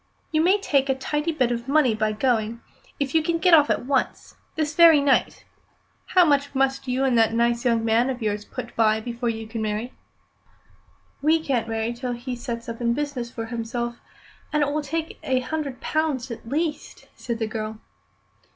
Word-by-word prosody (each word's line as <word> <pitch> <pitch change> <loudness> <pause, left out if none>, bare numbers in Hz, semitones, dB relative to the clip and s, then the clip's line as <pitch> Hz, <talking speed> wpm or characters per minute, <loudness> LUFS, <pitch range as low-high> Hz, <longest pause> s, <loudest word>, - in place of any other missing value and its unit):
You 310 -1 +2
may 375 +5 +4
make 275 -1 +4
a 265 - +3
tidy 295 +4 -2
bit 255 -6 +1
of 235 +1 -3
money 280 -4 +3
by 215 0 0
going, 230 0 0 0.4
if 275 -2 -2
you 320 - +4
can 330 +2 0
get 355 +1 +3
off 300 -3 +7
at - - 0
once 270 0 -1 0.2
this 310 -1 -1
very 330 -1 +7
night. 280 -2 +1 0.7
How 360 -1 +7
much 285 -2 +1
must 270 0 0
you 255 +1 0
and 260 -2 +2
that 225 0 +3
nice 235 +1 +1
young 230 -2 +2
man 230 +3 +3
of 255 -2 -3
yours 210 -2 -2
put 240 - -8
by 220 -1 +3
before 235 +1 -3
you 225 -1 -4
can 225 0 -5
marry?" 215 +3 -3 1.3
"We 315 +3 +3
can't 245 -7 -1
marry 225 +1 -1
till 245 +1 -4
he 245 +1 -5
sets 235 -1 -6
up 230 0 -6
in 235 0 +1
business 285 -5 -3
for 225 -1 -6
himself, 235 +1 -4 0.5
and 300 -1 +2
it 285 - 0
will 305 +1 -1
take 320 +3 -4
a 260 -1 0
hundred 280 -2 -4
pounds 290 -5 -1
at 230 0 -8
least," 305 +2 -3
said 235 -2 -4
the 225 - -1
girl. 215 0 -5
250 Hz, 195 wpm, -24 LUFS, 230-290 Hz, 1.3 s, off